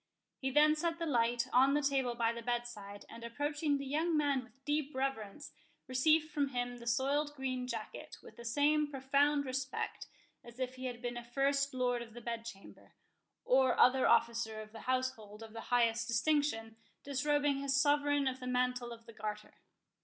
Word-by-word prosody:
He 265 - -1
then 300 +3 +5
set 330 +1 -1
the 335 - -2
light 240 -3 +1
on 270 +3 +5
the 295 - +2
table 265 -3 +1
by 230 -1 +1
the 235 - -6
bedside, 235 -4 -4
and 230 - -11
approaching 290 +5 -1
the 275 - -5
young 315 +4 +1
man 285 -3 +1
with 250 +4 -22
deep 295 -1 -1
reverence, 265 -1 -3 0.3
received 310 +5 +3
from 285 -2 +1
him 245 -2 -3
the 235 0 -11
soiled 280 +5 +1
green 255 -2 -3
jacket, - - -6
with - - -13
the 235 - -10
same 295 +5 +2
profound 285 +1 +2
respect 260 0 -3 0.4
as 235 +1 -13
if 255 0 -2
he 260 0 -7
had 245 -1 -5
been 240 0 -3
a 240 - -6
first 275 +3 +1
lord 245 -1 +1
of 230 -1 -10
the - - -7
bedchamber, 230 -3 -8 0.5
or 260 0 +3
other 255 +1 +5
officer 230 -2 +2
of 215 0 -9
the 225 - -10
household 225 -5 -2
of 220 -1 -11
the 225 - -6
highest 235 -1 +2
distinction, 235 -3 0 0.3
disrobing 285 +1 +1
his 275 0 +1
Sovereign 290 -1 +3
of 260 0 -2
the 250 - -6
Mantle 250 -1 0
of 230 -1 -10
the 230 - -12
Garter. 210 -1 -6
255 Hz, 185 wpm, -34 LUFS, 235-285 Hz, 0.5 s, then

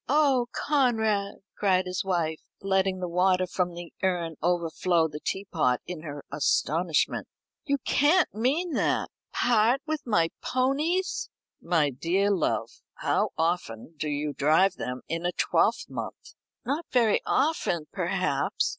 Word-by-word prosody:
"Oh, 275 -4 +3
Conrad!" 220 -8 +1 0.2
cried 185 -2 +2
his 180 +2 -2
wife, 170 -4 -1 0.2
letting 190 -1 +1
the 180 - -3
water 185 +1 +2
from 180 -1 -2
the 175 0 -9
urn 175 -3 0
overflow 170 0 +1
the 150 -1 -7
teapot 160 -10 0
in 175 -3 -6
her 145 -3 -8
astonishment; 155 +3 +1 0.4
"you 280 -2 +1
can't 315 +7 +3
mean 290 +10 0
that! - - 0 0.2
Part 240 +3 +2
with 310 -1 -2
my 170 -7 +3
ponies?" 305 +9 0 0.3
"My 160 -4 +2
dear 180 +10 +1
love, 185 -5 -1
how - - +1
often 160 -6 -2
do 155 0 -3
you 145 0 -2
drive 160 +7 +3
them 125 +1 -5
in 165 +1 -3
a 175 - +1
twelvemonth?" - - -1 0.3
"Not 290 +6 -2
very 230 -4 +3
often, 260 - +1
perhaps. - - 0
185 Hz, 130 wpm, -27 LUFS, 165-245 Hz, 0.4 s, Oh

